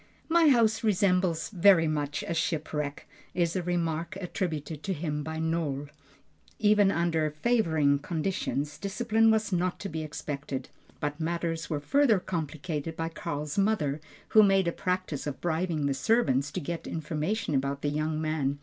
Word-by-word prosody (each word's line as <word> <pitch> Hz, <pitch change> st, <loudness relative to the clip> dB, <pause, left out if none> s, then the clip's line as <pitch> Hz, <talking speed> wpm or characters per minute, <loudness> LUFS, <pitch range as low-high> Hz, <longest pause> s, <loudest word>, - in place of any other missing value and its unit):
"My 330 Hz, 0 st, +5 dB
house 230 Hz, -5 st, +3 dB
resembles 185 Hz, -5 st, +2 dB
very 185 Hz, -4 st, +5 dB
much 145 Hz, -1 st, -2 dB
a 170 Hz, -, -1 dB
shipwreck" 150 Hz, -3 st, -2 dB, 0.3 s
is 170 Hz, -1 st, +1 dB
a 185 Hz, -, +1 dB
remark 170 Hz, +1 st, -2 dB
attributed 160 Hz, -5 st, -3 dB
to 195 Hz, -, -2 dB
him 150 Hz, -2 st, -3 dB
by 160 Hz, +1 st, -5 dB
Nohl. 160 Hz, -3 st, -1 dB, 0.7 s
Even 210 Hz, -2 st, +4 dB
under 170 Hz, -4 st, +1 dB
favoring 155 Hz, -5 st, +2 dB
conditions, 155 Hz, -2 st, -2 dB
discipline 225 Hz, +2 st, +2 dB
was 220 Hz, -2 st, +2 dB
not 180 Hz, +1 st, 0 dB
to 200 Hz, -, -4 dB
be 160 Hz, 0 st, -4 dB
expected, 140 Hz, -3 st, -5 dB, 0.3 s
but 145 Hz, +1 st, -3 dB
matters 165 Hz, 0 st, -2 dB
were 150 Hz, -3 st, -1 dB
further 240 Hz, -, +3 dB
complicated 160 Hz, -2 st, -4 dB
by 165 Hz, 0 st, -2 dB
Karl's 150 Hz, +1 st, -4 dB
mother, 155 Hz, -9 st, +1 dB, 0.3 s
who 215 Hz, -, +7 dB
made 195 Hz, -3 st, +4 dB
a -, -, +2 dB
practice 180 Hz, -5 st, -2 dB
of 145 Hz, -, -4 dB
bribing 165 Hz, -2 st, -1 dB
the 140 Hz, -, +1 dB
servants 140 Hz, -, +2 dB
to -, -, -1 dB
get 170 Hz, +1 st, -5 dB
information 160 Hz, +4 st, -2 dB
about 140 Hz, +1 st, -1 dB
the 145 Hz, -, +1 dB
young 155 Hz, +1 st, -1 dB
man. 155 Hz, -3 st, -1 dB
165 Hz, 155 wpm, -28 LUFS, 150-190 Hz, 0.7 s, who